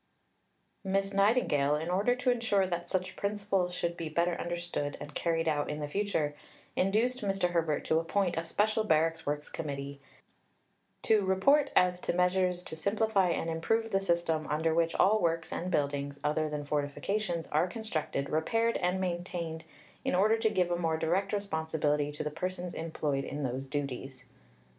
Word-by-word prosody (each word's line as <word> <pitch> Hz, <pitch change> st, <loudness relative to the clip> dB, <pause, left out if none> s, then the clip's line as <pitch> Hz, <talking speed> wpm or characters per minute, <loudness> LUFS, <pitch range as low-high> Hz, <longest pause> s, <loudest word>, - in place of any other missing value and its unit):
Miss 195 Hz, 0 st, 0 dB
Nightingale, 195 Hz, -, +3 dB
in 160 Hz, +3 st, -2 dB
order 205 Hz, +7 st, +2 dB
to 250 Hz, 0 st, +1 dB
ensure 225 Hz, -5 st, +2 dB
that 175 Hz, -2 st, -3 dB
such 185 Hz, 0 st, -2 dB
principles 200 Hz, -3 st, 0 dB
should 170 Hz, -1 st, -2 dB
be 165 Hz, -2 st, -4 dB
better 170 Hz, +3 st, +1 dB
understood 170 Hz, -4 st, -3 dB
and 150 Hz, -, -8 dB
carried 165 Hz, 0 st, 0 dB
out 145 Hz, -2 st, +1 dB
in 150 Hz, -, -3 dB
the 150 Hz, -, -3 dB
future, 155 Hz, -4 st, -1 dB, 0.4 s
induced 225 Hz, +7 st, +1 dB
Mr. 195 Hz, -3 st, 0 dB
Herbert 165 Hz, -4 st, 0 dB
to 160 Hz, -, +3 dB
appoint 175 Hz, +2 st, 0 dB
a 165 Hz, -, -1 dB
special 215 Hz, +6 st, +1 dB
Barracks 165 Hz, -4 st, +1 dB
Works 150 Hz, 0 st, -2 dB
Committee, 140 Hz, -2 st, -5 dB, 1.0 s
"to 215 Hz, -2 st, +4 dB
report 270 Hz, +10 st, +4 dB
as 180 Hz, 0 st, +3 dB
to -, -, -1 dB
measures 180 Hz, 0 st, +2 dB
to 160 Hz, -, -6 dB
simplify 200 Hz, +2 st, +2 dB
and 165 Hz, -, -1 dB
improve 225 Hz, +8 st, 0 dB
the 195 Hz, -, +3 dB
system 170 Hz, -4 st, 0 dB
under 160 Hz, +2 st, +1 dB
which 165 Hz, 0 st, +1 dB
all 215 Hz, +2 st, +4 dB
works 165 Hz, -1 st, 0 dB
and 180 Hz, -, -3 dB
buildings, 140 Hz, -3 st, -1 dB
other 155 Hz, +1 st, +1 dB
than 150 Hz, -1 st, -4 dB
fortifications, 165 Hz, +5 st, -1 dB
are 155 Hz, +4 st, +3 dB
constructed, 175 Hz, -9 st, -3 dB
repaired, 225 Hz, +9 st, +1 dB
and 180 Hz, +1 st, 0 dB
maintained, 175 Hz, -3 st, -3 dB, 0.4 s
in -, -, 0 dB
order 215 Hz, +4 st, +4 dB
to 220 Hz, -, +3 dB
give 180 Hz, -4 st, +1 dB
a 175 Hz, -, +1 dB
more 165 Hz, -2 st, +1 dB
direct 185 Hz, +5 st, 0 dB
responsibility 160 Hz, -7 st, 0 dB
to 150 Hz, -, -5 dB
the 150 Hz, -, -3 dB
persons 180 Hz, +2 st, -4 dB
employed 150 Hz, -4 st, -2 dB
in 145 Hz, +1 st, -4 dB
those 130 Hz, +1 st, -3 dB
duties." 135 Hz, -2 st, -4 dB
170 Hz, 165 wpm, -31 LUFS, 155-195 Hz, 1.0 s, to